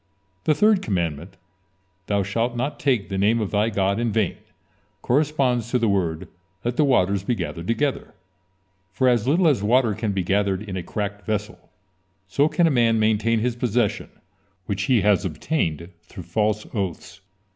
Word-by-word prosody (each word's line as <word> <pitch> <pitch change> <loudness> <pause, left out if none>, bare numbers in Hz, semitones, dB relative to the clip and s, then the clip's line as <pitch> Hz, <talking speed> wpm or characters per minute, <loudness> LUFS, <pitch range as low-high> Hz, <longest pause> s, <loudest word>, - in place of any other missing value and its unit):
The 155 - +3
third 210 +3 +4
commandment: 85 - -3 0.7
"Thou 100 -1 +1
shalt 115 +5 -1
not 130 +5 -3
take 125 -8 +1
the 95 -1 -2
name 110 +4 +3
of 105 -3 -2
thy 105 +2 +2
God 100 -1 0
in 120 -1 0
vain" 105 -3 0 0.7
corresponds 130 -4 +1
to 125 - +1
the 115 -2 +1
word: 85 -6 -1 0.4
"Let 120 0 -1
the 150 - +3
waters 100 -8 +2
be 120 +4 0
gathered 85 -3 -5
together," 135 0 -1 0.8
for 130 +6 +1
as 120 -2 +2
little 165 +5 +3
as 140 -10 +2
water 115 +1 +3
can 110 0 -2
be 95 -2 -1
gathered 100 +1 0
in 100 -3 -6
a 95 - -3
cracked 100 +2 -4
vessel, 105 +1 -4 0.6
so 140 +10 +2
can 175 - +2
a 165 - +3
man 115 -3 +3
maintain 110 +1 +2
his 120 0 -1
possession 120 0 -1 0.6
which 100 +1 -3
he 125 -5 +3
has 105 0 +3
obtained 85 - -2
through - - -11
false 105 -1 -1
oaths. 95 -1 -4
110 Hz, 170 wpm, -23 LUFS, 100-125 Hz, 0.8 s, third